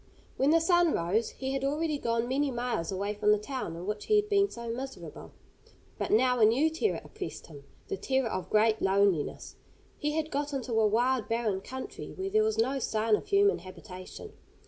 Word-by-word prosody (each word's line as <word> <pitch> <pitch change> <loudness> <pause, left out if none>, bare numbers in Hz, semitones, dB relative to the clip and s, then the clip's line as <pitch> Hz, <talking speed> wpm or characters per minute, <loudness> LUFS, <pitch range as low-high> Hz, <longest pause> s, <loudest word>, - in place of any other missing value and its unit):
When 270 - +2
the 330 +2 +5
sun 345 -1 +3
rose 195 +7 0
he 265 0 -5
had 270 0 -2
already 295 +2 0
gone 230 -1 0
many 275 +3 +1
miles 240 -9 -2
away 200 +2 -2
from 210 0 +2
the 210 - +5
town 210 -5 -5
in 170 +2 -7
which 210 +1 -4
he 425 - +4
had 420 0 +2
been 400 -1 +3
so 235 0 -8
miserable. 260 +4 -7 0.7
But - - -2
now 250 +2 +3
a 220 - +7
new 270 +9 +3
terror 330 +7 0
oppressed 400 -4 -7
him 145 -3 -13 0.2
the 395 - -3
terror 265 -6 0
of 185 -4 -4
great 215 +1 +3
loneliness. 195 -5 +1 0.4
He 300 0 -1
had 315 0 -2
got 290 +1 -2
into 255 -3 -3
a 220 -1 +4
wild, 240 +2 +1
barren 225 -4 0
country, 260 +5 -7
where 385 +1 -4
there 435 +1 +4
was 435 0 0
no 265 +4 +1
sign 220 -2 +1
of 405 - -6
human 405 0 +3
habitation. 185 - -10
250 Hz, 200 wpm, -29 LUFS, 215-300 Hz, 0.7 s, a